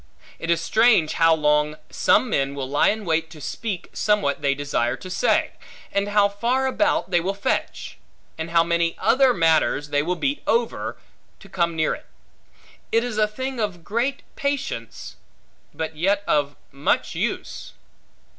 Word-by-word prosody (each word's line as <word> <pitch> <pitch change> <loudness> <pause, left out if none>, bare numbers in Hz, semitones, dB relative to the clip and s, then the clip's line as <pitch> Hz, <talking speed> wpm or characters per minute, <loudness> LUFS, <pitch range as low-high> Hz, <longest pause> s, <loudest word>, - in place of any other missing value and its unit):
It 165 - -5
is 170 -1 +3
strange 215 -3 +3
how 165 -1 +4
long 150 0 +2 0.2
some 145 - +3
men 140 - 0
will 135 -2 -4
lie 145 +2 +2
in 215 0 -2
wait 165 -1 0
to 160 -1 -12
speak 195 +5 -5
somewhat 205 -10 +1
they 140 -1 +1
desire 140 -4 -1
to 185 - -9
say; - - +1 0.4
and 200 0 0
how 205 0 +4
far 235 +6 0
about 265 -6 +1
they 175 - +4
will 190 +3 -2
fetch; 200 - -3 0.4
and 160 +1 -5
how 165 0 +4
many 170 0 0
other 255 +6 +4
matters 160 - +2
they 145 0 +2
will 175 +4 -1
beat 275 +9 -1
over, 235 -4 0 0.4
to 195 - -14
come 170 -3 -1
near 155 -1 +1
it. - - -10 0.8
It 230 +1 +3
is 230 -3 -3
a 215 - +4
thing 260 +4 -5
of 195 -6 -3
great 235 +8 -1
patience, 280 - -4 0.5
but 160 0 -5
yet 195 +5 +1
of 145 -1 +1 0.2
much 140 +1 0
use. - - -4
175 Hz, 165 wpm, -23 LUFS, 155-220 Hz, 0.8 s, how